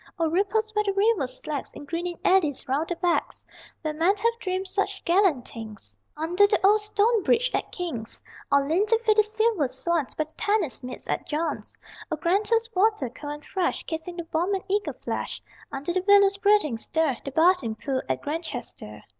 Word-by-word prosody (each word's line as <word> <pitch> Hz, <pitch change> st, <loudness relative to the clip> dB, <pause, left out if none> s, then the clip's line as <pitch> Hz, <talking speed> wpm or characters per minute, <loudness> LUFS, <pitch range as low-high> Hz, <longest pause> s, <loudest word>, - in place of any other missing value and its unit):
O 330 Hz, -1 st, +1 dB
ripples 410 Hz, +6 st, 0 dB
where 425 Hz, 0 st, +2 dB
the 400 Hz, -1 st, 0 dB
river 400 Hz, -, +2 dB
slacks 275 Hz, +2 st, -5 dB
In -, -, -9 dB
greening 345 Hz, +3 st, -3 dB
eddies 335 Hz, -7 st, +2 dB
round 285 Hz, +5 st, 0 dB
the 350 Hz, -, -1 dB
"backs"; 345 Hz, 0 st, -1 dB, 0.4 s
Where 310 Hz, -1 st, -1 dB
men 335 Hz, +6 st, +3 dB
have 465 Hz, +3 st, 0 dB
dreamed 375 Hz, -1 st, -2 dB
such 400 Hz, +1 st, -2 dB
gallant 345 Hz, -8 st, +3 dB
things 220 Hz, -3 st, -9 dB, 0.2 s
Under 350 Hz, +6 st, +3 dB
the 405 Hz, -, +2 dB
old 420 Hz, +2 st, +5 dB
stone 425 Hz, +2 st, +2 dB
bridge -, -, +2 dB
at -, -, -2 dB
King's. 280 Hz, -12 st, -4 dB, 0.3 s
Or 280 Hz, 0 st, +4 dB
leaned 360 Hz, +8 st, +2 dB
to 455 Hz, -, +4 dB
feed 430 Hz, -2 st, +4 dB
the -, -, +8 dB
silver 430 Hz, -, +1 dB
swans 290 Hz, +3 st, -1 dB
By 310 Hz, -, 0 dB
the 310 Hz, -, -8 dB
tennis 390 Hz, -, 0 dB
meads 250 Hz, 0 st, -7 dB
at -, -, -2 dB
John's. 315 Hz, +2 st, -2 dB, 0.3 s
O -, -, +1 dB
Granta's 410 Hz, +8 st, +1 dB
water, 380 Hz, -, +2 dB
cold 290 Hz, +3 st, -6 dB
and 295 Hz, 0 st, -10 dB
fresh, 370 Hz, -2 st, -1 dB
Kissing 325 Hz, +2 st, -5 dB
the 340 Hz, -1 st, -5 dB
warm 350 Hz, +5 st, +1 dB
and 380 Hz, -, -4 dB
eager 410 Hz, +2 st, 0 dB
flesh -, -, -4 dB, 0.3 s
Under 285 Hz, +6 st, -3 dB
the 370 Hz, 0 st, 0 dB
willow's 400 Hz, -1 st, +6 dB
breathing 400 Hz, -, +3 dB
stir 310 Hz, -1 st, 0 dB
The -, -, -4 dB
bathing 320 Hz, -6 st, +3 dB
pool 265 Hz, +2 st, -2 dB
at 130 Hz, -, -1 dB
Grantchester.... 275 Hz, -, -5 dB
345 Hz, 190 wpm, -26 LUFS, 295-405 Hz, 0.4 s, the